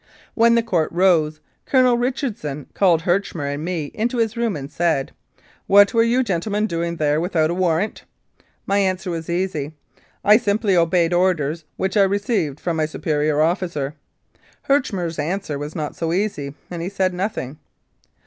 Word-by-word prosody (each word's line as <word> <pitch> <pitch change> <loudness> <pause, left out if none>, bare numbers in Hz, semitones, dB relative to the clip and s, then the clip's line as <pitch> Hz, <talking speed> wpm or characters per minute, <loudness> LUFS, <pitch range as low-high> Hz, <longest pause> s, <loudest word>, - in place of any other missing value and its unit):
When 230 0 +4
the 235 - +3
Court 175 -9 0
rose, 165 -4 +2 0.3
Colonel 255 -2 +4
Richardson 235 - -3
called 175 -5 +3
Herchmer 175 -6 -1
and 145 +2 -5
me 165 -4 -3
into 235 +3 -1
his 225 -1 0
room 235 -3 -1
and 140 0 -7
said, 160 -4 0 0.3
" - - -30 0.2
What 200 +3 +6
were 230 - +4
you 240 +3 +3
gentlemen 205 +1 -1
doing 170 -3 -2
there 150 -1 +1
without 165 -3 +1
a - - 0
warrant?" 180 +2 -1 0.6
My 200 +1 +1
answer 185 -1 0
was 165 -1 -5
easy. 170 -4 -2 0.5
"I 210 +1 +7
simply 205 -3 +1
obeyed 170 0 +2
orders 170 -3 +1
which 190 +1 -1
I - - +6
received 195 - 0
from 170 -2 -2
my 155 -1 +1
superior 150 -1 0
officer." 160 -4 -1 0.7
Herchmer's 190 - 0
answer 155 -1 -2
was 145 +2 -6
not 155 -3 -4
so 165 0 -2
easy, 170 -8 -2 0.2
and 170 -1 -4
he 175 - -3
said 190 -2 0
nothing. 180 - -4
175 Hz, 165 wpm, -21 LUFS, 155-205 Hz, 0.7 s, I